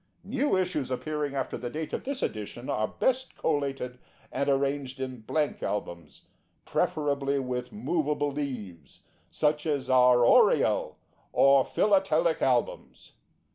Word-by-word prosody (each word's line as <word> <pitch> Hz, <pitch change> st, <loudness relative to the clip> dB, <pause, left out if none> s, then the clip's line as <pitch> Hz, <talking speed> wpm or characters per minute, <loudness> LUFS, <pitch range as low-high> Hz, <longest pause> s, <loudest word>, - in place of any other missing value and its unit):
New 260 Hz, +1 st, 0 dB
issues 175 Hz, -8 st, -1 dB
appearing 145 Hz, +2 st, -3 dB
after 135 Hz, -2 st, -3 dB
the 120 Hz, -, -4 dB
date 155 Hz, +4 st, -5 dB
of -, -, -3 dB
this 275 Hz, 0 st, -2 dB
edition 110 Hz, +4 st, -4 dB
are 110 Hz, 0 st, 0 dB
best 260 Hz, -, -1 dB
collated 135 Hz, -5 st, -2 dB, 0.3 s
and 140 Hz, -, -1 dB
arranged 135 Hz, -1 st, -1 dB
in 130 Hz, -2 st, -5 dB
blank 150 Hz, +6 st, -1 dB
albums, 85 Hz, -6 st, -5 dB, 0.4 s
preferably 140 Hz, -2 st, 0 dB
with 125 Hz, -2 st, -3 dB
movable 150 Hz, -8 st, -1 dB
leaves, 105 Hz, -, -6 dB, 0.3 s
such 150 Hz, -, 0 dB
as 140 Hz, -4 st, -1 dB
our 125 Hz, -1 st, +6 dB
ORIEL -, -, +4 dB, 0.4 s
or 135 Hz, -1 st, +5 dB
PHILATELIC 205 Hz, -, +2 dB
ALBUMS. -, -, -1 dB
140 Hz, 125 wpm, -28 LUFS, 125-155 Hz, 0.4 s, our